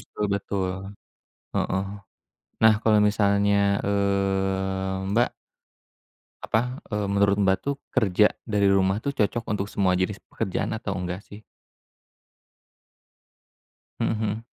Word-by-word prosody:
betul 105 - -5
betul, 95 -2 -2 0.8
heeh. 95 - 0 0.8
Nah 110 -1 +7
kalau 110 -1 +5
misalnya, 100 -1 +2 0.3
eee, 95 -1 0
Mbak 120 +4 +3 1.1
Apa, 125 +4 -1
eee, 105 -1 -1
menurut 100 0 +2
Mbak 95 -2 +3
tuh 140 0 -2 0.2
kerja 105 0 +3 0.2
dari 105 -2 +2
rumah 95 0 +3
tuh 140 +6 -3
cocok 115 -1 0
untuk 100 0 -2
semua 95 -3 +1
jenis 95 +2 0
pekerjaan 95 +4 -3
atau 100 -3 -3
enggak 90 +1 -4
sih? 105 +1 -13 2.6
Mhm - - +1
mhm. 110 0 -2
100 Hz, 110 wpm, -25 LUFS, 95-105 Hz, 2.6 s, Nah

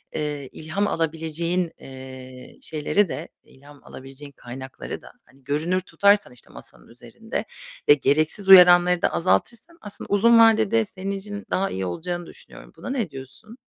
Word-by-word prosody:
eee, 145 -3 -4
ilham 185 +7 -3
alabileceğin, 165 +2 -2
eee, 130 -1 -12
şeyleri 160 +6 0
de, - - -6 0.2
ilham 140 +1 -18
alabileceğin 135 +2 -12
kaynakları 130 0 -9
da, - - -15
hani, 135 +2 -25
görünür 155 +7 -1
tutarsan, 200 -4 +2
işte, 125 - -16
masanın - - -14
üzerinde - - -7 0.4
ve - - +10
gereksiz 155 +8 0
uyaranları 180 -1 +8
da - - +2
azaltırsan 235 - -1
aslında 205 -1 -9
uzun 230 +3 +5
vadede 225 0 +4
senin 195 0 -6
için 205 +1 -8
daha 195 +1 0
iyi 95 0 -4
olacağını 175 - -5
düşünüyorum. - - -15
Buna - - -8
ne 240 - -2
diyorsun? 135 - -12
165 Hz, 145 wpm, -23 LUFS, 135-200 Hz, 0.4 s, ve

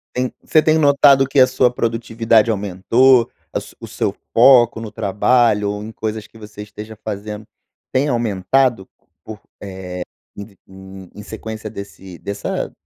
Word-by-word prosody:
Tem 125 0 -2
você 155 - +3
tem 155 0 +2
notado 140 -2 +5
que 140 - +1
a 130 - +7
sua 125 -1 +2
produtividade 115 -1 +1
aumentou? 115 +5 +2 0.2
A - - 0
su - - -14
o - - -9
seu - - -2 0.2
foco 120 -1 +5
no 110 -2 -7
trabalho 105 0 +1
ou 105 0 -6
em 110 - -8
coisas 110 -1 -5
que - - -19
você 105 -1 -11
esteja 105 +1 -11
fazendo, 105 0 -6 0.5
tem 130 +3 +1
aumentado 120 -1 0 0.4
por 110 -2 -9 0.2
eh, 95 -2 -8 0.5
em 100 - -7
vi 100 -1 -20
em 95 -1 -13
em 105 - -10
sequência 110 0 -8
desse 100 -3 -10
dessa 100 0 -4
110 Hz, 160 wpm, -18 LUFS, 100-125 Hz, 0.5 s, a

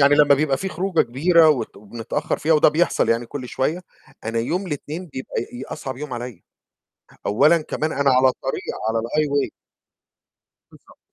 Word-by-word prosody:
يعني 140 +1 +6
لمّا 145 -1 +6
بيبقى 140 -1 +1
في 190 - -4
خروجة 185 0 0
كبيرة 160 +6 +4
وت 145 -5 0
وبنتأخّر 110 +2 -4
فيها، 160 - +2
وده 150 - +6
بيحصل 160 +3 +1
يعني 115 +1 +1
كل 130 -1 -7
شوية، 160 +7 -1 0.4
أنا 115 +1 -2
يوم 175 +12 -1
الاتنين 155 +3 -5
بيبقى 130 -4 -5
ي 125 +2 -8
أصعب 130 -1 -6
يوم 145 -1 -7
عليّا، 120 -7 -7 0.8
أولًا 155 +11 +4
كمان 155 +1 -3
أنا 140 -1 +2
على 130 +1 +5
الطريق 130 +1 -2 0.3
على 115 0 0
الhighway. 145 +4 0 1.2
بالضبط - - -20
140 Hz, 160 wpm, -22 LUFS, 125-155 Hz, 1.2 s, يعني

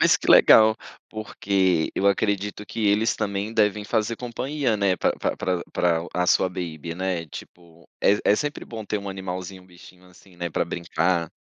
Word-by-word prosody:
Mas - - +5
que - - -2
legal, 110 0 +7 0.3
porque 95 -5 0
eu 100 - 0
acredito 100 0 0
que 110 -2 -2
eles 110 +3 +2
também 100 +2 -3
devem 105 -1 +1
fazer 110 +2 -1
companhia, 125 0 -2
né, 100 -3 +1
pra - - +1 0.2
pra 90 -2 -2
pra 85 -1 +1
a 90 0 0
sua 95 - +3
baby, 85 -3 -6
né. 90 -2 -3
Tipo, 85 +2 -13
é 105 +1 +4
é 105 - +4
sempre 145 +3 -3
bom 110 -2 -8
ter 105 +1 -2
um 100 - -7
animalzinho, 95 0 -6
um - - -21
bichinho, 90 0 -17
assim, 90 0 -20
né, 85 0 -4
pra - - 0
brincar. 85 -1 -1
95 Hz, 180 wpm, -24 LUFS, 90-105 Hz, 0.3 s, legal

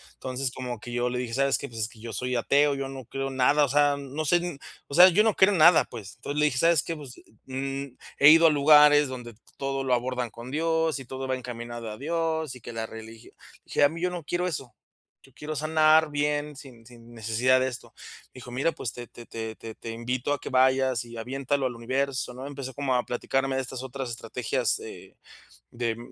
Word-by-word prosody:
entonces, 130 0 -3
como 125 -3 -6
que 120 - -9
yo 120 0 0
le 125 0 -3
dije: 120 -2 -4
"¿Sabes 140 0 +2
qué?, - - -6
pues 115 -1 -8
es 110 - 0
que 115 - -17
yo 115 0 -7
soy 125 0 -1
ateo, 140 +4 +3
yo 135 0 -3
no 135 -2 -8
creo 135 +3 -4
nada". 135 +3 +3
O - - -5
sea, 145 +1 +3
no 140 +2 -5
sé, 175 0 +1 0.3
o - - -10
sea, 180 +3 +10
yo 195 +4 +4
no 220 -2 +2
creo 195 +2 +5
en 185 - 0
nada, 165 +2 +7
pues, 105 -4 -10
entonces, 145 +1 -4
le 150 - +4
dije: 140 -4 0
"¿Sabes 165 -1 +4
qué?, 165 - -4
pues, 140 -4 -10
eh, - - -19 0.2
mm, 135 0 -5 0.2
he 140 - +9
ido 165 +1 +8
a - - +4
lugares 150 0 +6
donde 120 -3 -8 0.2
todo 135 0 -2
lo 130 - +1
abordan 125 0 -1
con 120 +3 -10
Dios, 160 0 0
y 135 - -9
todo 130 +2 -6
va 130 - 0
encaminado 120 -2 -7
a 105 - -8
Dios, 160 -1 -2
y 125 - -13
que 115 - -9
la 115 0 -3
religio 110 0 -11 0.3
dije, - - +1
a 145 - +6
mí, 165 +2 -7
yo 180 - +1
no 175 -2 -6
quiero 175 +4 -1
eso, 130 -9 -5 0.5
yo - - -21
quiero 155 +1 -6
sanar 155 +1 +4
bien 145 0 -1
sin 125 -5 -13
sin 120 -1 -15
necesidad 115 +3 +2
de 130 - +1
esto", 125 - -10 0.4
dijo: 125 -1 -11
"Mira, 135 +7 0
pues, 115 - -5
te 120 -1 -8
te 120 - -13
te 110 -1 -6
te 115 0 -8
invito 125 +4 -2
a 145 - -3
que - - -6
vayas 130 -2 +2
y 120 0 -11
aviéntalo 135 +3 -1
al 120 - -6
universo, 130 +2 -2
¿no?". 130 +2 -8
Empezó 140 -2 -7
como 135 0 -1
a 125 - +1
platicarme 135 +2 -1
de - - +1
estas 130 0 -7
otras 130 0 -5
estrategias, 115 - -2
eh, - - -11 0.6
de, 115 -2 -2
130 Hz, 230 wpm, -26 LUFS, 120-145 Hz, 0.6 s, sea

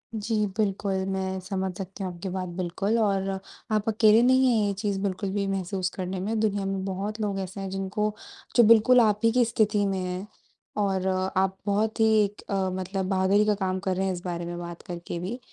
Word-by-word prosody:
जी 220 +1 -2 0.2
बिल्कुल, 200 -2 0 0.2
मैं 190 0 -2
समझ 190 0 -2
सकती 195 +1 -6
हूँ 185 - -3
आपकी 175 +2 -6
बात 185 0 -3
बिल्कुल, 190 +5 0
और 195 -2 +1 0.4
आप 215 0 +1
अकेले 220 0 +5
नहीं 260 +1 +5
है - - +2
ये 200 - 0
चीज़ 200 -1 -2
बिल्कुल 195 0 -2
भी 200 -1 0
महसूस 190 -1 -2
करने 185 0 -3
में 215 +4 -1
दुनिया 205 -2 0
में 195 -1 -2
बहुत 200 +3 -3
लोग 200 -2 -1
ऐसे 190 +1 -5
हैं 195 - -4
जिनको 195 +2 -2 0.4
जो 240 - +7
बिल्कुल 230 +3 +6
आप 210 -2 +3
ही 230 - +5
की 245 0 +3
स्थिति 210 -2 +1
में 195 -1 -1
है, 185 +2 -4 0.5
और 190 -2 0
आप 190 0 0
बहुत 215 +2 0
ही 220 -2 +5 0.2
अ, 195 -1 0
मतलब 190 +1 -3
बहादुरी 195 +2 +3
का 210 - +3
काम 190 -1 -1
कर 185 0 -1
रहे 190 +1 0
हैं 190 - 0
इस 175 - -6
बारे 175 -1 -3
में 175 0 -5
बात 170 -1 -7
करके 170 -1 -6
भी। 200 +9 -4
195 Hz, 210 wpm, -26 LUFS, 185-210 Hz, 0.5 s, जो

